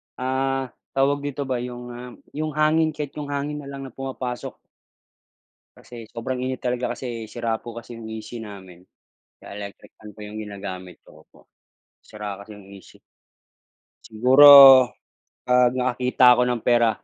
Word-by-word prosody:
ah, 130 Hz, 0 st, -2 dB, 0.2 s
tawag 140 Hz, +1 st, +2 dB
dito 145 Hz, 0 st, -5 dB
ba, 130 Hz, -2 st, -3 dB
yung, 125 Hz, 0 st, -7 dB
ah, 125 Hz, +1 st, -10 dB, 0.2 s
yung 155 Hz, 0 st, -5 dB
hangin, 155 Hz, +1 st, +2 dB
kahit 145 Hz, -2 st, -5 dB
yung 145 Hz, -, -6 dB
hangin 145 Hz, +1 st, -4 dB
na, 140 Hz, -, -10 dB
lang 140 Hz, -1 st, -8 dB
na 135 Hz, -, -9 dB
pumapasok. 130 Hz, -1 st, -6 dB, 1.2 s
Kasi 115 Hz, -2 st, -12 dB
sobrang 120 Hz, +3 st, -5 dB
init 130 Hz, +1 st, -4 dB
talaga, 125 Hz, 0 st, -2 dB
kasi, 115 Hz, -3 st, -7 dB
sira 115 Hz, 0 st, -3 dB
po 120 Hz, -1 st, -10 dB
kasi 115 Hz, 0 st, -10 dB
'yong 110 Hz, -, -9 dB
AC 115 Hz, +2 st, -8 dB
namin, 95 Hz, -5 st, -11 dB, 0.6 s
kaya 100 Hz, -, -11 dB
electric 100 Hz, -1 st, -11 dB
fan 105 Hz, -1 st, -13 dB
po 105 Hz, -, -17 dB
'yong 105 Hz, 0 st, -9 dB
ginagamit 95 Hz, -3 st, -9 dB
ko, -, -, -20 dB
opo. -, -, -25 dB, 0.5 s
Sira 105 Hz, -2 st, -8 dB
kasi 100 Hz, +2 st, -12 dB
'yong 105 Hz, -1 st, -14 dB
AC. 95 Hz, -, -19 dB, 1.0 s
Siguro, 125 Hz, +6 st, +5 dB, 1.0 s
'pag 125 Hz, -1 st, +4 dB
nakakita 125 Hz, 0 st, 0 dB
ako 125 Hz, -, +1 dB
ng 120 Hz, -1 st, -2 dB
pera, 120 Hz, -2 st, +4 dB
125 Hz, 155 wpm, -23 LUFS, 110-135 Hz, 1.2 s, Siguro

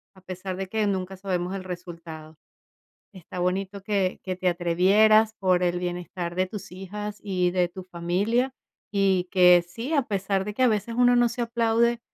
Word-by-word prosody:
a 190 Hz, -, -17 dB
pesar 185 Hz, 0 st, -6 dB
de 190 Hz, 0 st, -4 dB
que 215 Hz, +2 st, 0 dB
nunca 190 Hz, -1 st, -2 dB
sabemos 185 Hz, -1 st, -2 dB
el 190 Hz, -, -5 dB
resultado. 165 Hz, -3 st, -9 dB, 0.8 s
Está 180 Hz, 0 st, -9 dB
bonito 190 Hz, +2 st, -2 dB
que 195 Hz, -2 st, 0 dB
que 185 Hz, -1 st, -3 dB
te 185 Hz, 0 st, -2 dB
atrevieras 200 Hz, +6 st, +4 dB
por 185 Hz, -2 st, +2 dB
el 175 Hz, 0 st, +1 dB
bienestar 175 Hz, 0 st, -4 dB
de 185 Hz, 0 st, +1 dB
tus 205 Hz, -2 st, -8 dB
hijas 205 Hz, +3 st, -6 dB
y 180 Hz, -3 st, 0 dB
de 180 Hz, -1 st, +2 dB
tu 185 Hz, +1 st, -9 dB
familia, 195 Hz, +9 st, -1 dB, 0.4 s
y 195 Hz, -3 st, +2 dB
que 180 Hz, -2 st, +6 dB
sí, 230 Hz, -, -5 dB
a 285 Hz, -, +4 dB
pesar 195 Hz, -1 st, -1 dB
de 210 Hz, -, -4 dB
que 255 Hz, -, 0 dB
a -, -, +6 dB
veces 220 Hz, +1 st, -1 dB
uno 245 Hz, 0 st, +5 dB
no 240 Hz, -1 st, +4 dB
se 240 Hz, +1 st, -4 dB
aplaude, 235 Hz, 0 st, +1 dB
190 Hz, 185 wpm, -25 LUFS, 180-210 Hz, 0.8 s, que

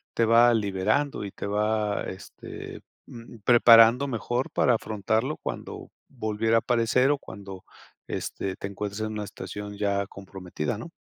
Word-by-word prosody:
te 115 Hz, -, +3 dB
va 115 Hz, +2 st, +6 dB
liberando 105 Hz, +6 st, 0 dB
y 100 Hz, -, -5 dB
te -, -, -7 dB
va, 105 Hz, 0 st, 0 dB
este, 95 Hz, -, -9 dB, 0.2 s
mm, 115 Hz, 0 st, -12 dB
preparando 120 Hz, +2 st, +7 dB
mejor 120 Hz, +1 st, -2 dB
para 125 Hz, -, +2 dB
afrontarlo 110 Hz, +5 st, -1 dB
cuando -, -, -7 dB, 0.2 s
volviera 110 Hz, -2 st, -1 dB
a -, -, +5 dB
aparecer 120 Hz, +3 st, +2 dB
o 145 Hz, -, 0 dB
cuando, 95 Hz, -1 st, -10 dB, 0.4 s
este, 95 Hz, -1 st, -4 dB
te -, -, -7 dB
encuentres 100 Hz, +1 st, -5 dB
en 110 Hz, 0 st, -2 dB
una 105 Hz, -1 st, -4 dB
estación 105 Hz, 0 st, -8 dB
ya 100 Hz, -1 st, 0 dB
comprometida, 95 Hz, -4 st, -6 dB
¿no? 170 Hz, -, -8 dB
110 Hz, 145 wpm, -26 LUFS, 100-120 Hz, 0.4 s, preparando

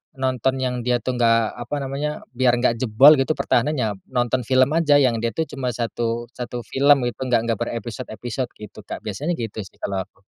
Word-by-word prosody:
nonton 130 Hz, -1 st, 0 dB
yang 125 Hz, -1 st, -1 dB
dia 120 Hz, -1 st, 0 dB
tuh 125 Hz, 0 st, -2 dB
nggak, 115 Hz, 0 st, +2 dB
apa 120 Hz, +4 st, -4 dB
namanya, 145 Hz, +3 st, -3 dB
biar 125 Hz, -1 st, +2 dB
nggak 120 Hz, -1 st, +1 dB
jebol 130 Hz, +5 st, +6 dB
gitu 135 Hz, +4 st, +1 dB
pertahanannya, 120 Hz, -6 st, 0 dB
nonton 125 Hz, -1 st, -1 dB
film 130 Hz, +1 st, +4 dB
aja, 155 Hz, -2 st, +3 dB
yang 130 Hz, -5 st, +3 dB
dia 115 Hz, 0 st, -2 dB
tuh 160 Hz, -, +1 dB
cuma 130 Hz, -6 st, -4 dB
1- 115 Hz, 0 st, -2 dB
1 120 Hz, -1 st, -5 dB
film 140 Hz, +1 st, +3 dB
itu, 120 Hz, -1 st, -3 dB
enggak 120 Hz, -2 st, +2 dB
enggak 115 Hz, -2 st, -1 dB
berepisode-episode 120 Hz, +1 st, -4 dB
gitu 105 Hz, 0 st, -11 dB
Kak, -, -, -6 dB
biasanya 135 Hz, -, -2 dB
gitu 115 Hz, -6 st, -5 dB
sih 95 Hz, -, -8 dB
kalau 100 Hz, -1 st, -3 dB
aku. 95 Hz, -1 st, -33 dB
120 Hz, 190 wpm, -22 LUFS, 115-130 Hz, -, jebol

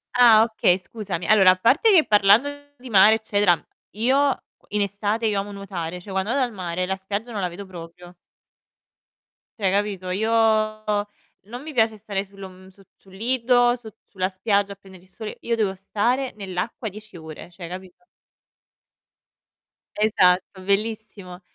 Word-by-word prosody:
Ah, 235 Hz, -3 st, +7 dB
okay, 220 Hz, -5 st, +2 dB
scusami. 190 Hz, -3 st, -6 dB
Allora, 195 Hz, -3 st, +6 dB
a -, -, +2 dB
parte 260 Hz, -, +3 dB
che 335 Hz, -5 st, +6 dB
parlando 210 Hz, +5 st, +5 dB, 0.3 s
di 250 Hz, 0 st, -11 dB
mare, 205 Hz, +2 st, +7 dB
eccetera, 205 Hz, -6 st, +2 dB, 0.4 s
io 265 Hz, +5 st, +1 dB, 0.3 s
in 210 Hz, 0 st, -1 dB
estate 205 Hz, +3 st, -1 dB
io 205 Hz, -2 st, +1 dB
amo 205 Hz, +1 st, -5 dB
nuotare, 180 Hz, -4 st, -6 dB
cioè, 195 Hz, +3 st, -11 dB
quando 190 Hz, +2 st, -1 dB
vado 270 Hz, +2 st, +1 dB
al 245 Hz, -, -2 dB
mare 180 Hz, -1 st, -3 dB
la 190 Hz, +1 st, -2 dB
spiaggia 200 Hz, +5 st, -5 dB
non 205 Hz, -3 st, -4 dB
la 180 Hz, -, 0 dB
vedo 200 Hz, +4 st, -9 dB
proprio 175 Hz, 0 st, -12 dB, 1.4 s
cioè, 195 Hz, -, +2 dB
capito, 200 Hz, -2 st, -1 dB
io 220 Hz, +5 st, -1 dB
non 215 Hz, 0 st, -1 dB
mi 310 Hz, +1 st, -8 dB
piace 225 Hz, -3 st, +2 dB
stare 200 Hz, -2 st, -4 dB
sul 195 Hz, 0 st, -16 dB
om 185 Hz, 0 st, -11 dB
su 195 Hz, +1 st, -20 dB
sul 190 Hz, -1 st, -21 dB
lido, 245 Hz, +2 st, +2 dB
su 240 Hz, -2 st, -13 dB, 0.2 s
sulla 185 Hz, -1 st, -2 dB
spiaggia 200 Hz, +1 st, 0 dB
a -, -, -16 dB
prendere 190 Hz, -2 st, -16 dB
il 185 Hz, -, -22 dB
sole, 220 Hz, +2 st, -8 dB
io 235 Hz, -, -1 dB
devo 205 Hz, -4 st, -1 dB
stare 240 Hz, +7 st, -1 dB
nell'acqua 195 Hz, +3 st, -5 dB
10 215 Hz, -1 st, -12 dB
ore, 160 Hz, +1 st, -10 dB
cioè, 175 Hz, -1 st, -9 dB
capito? 185 Hz, -, -10 dB, 1.9 s
Esatto, 190 Hz, -3 st, +2 dB
bellissimo. 200 Hz, -2 st, -3 dB
205 Hz, 160 wpm, -23 LUFS, 185-220 Hz, 1.9 s, Ah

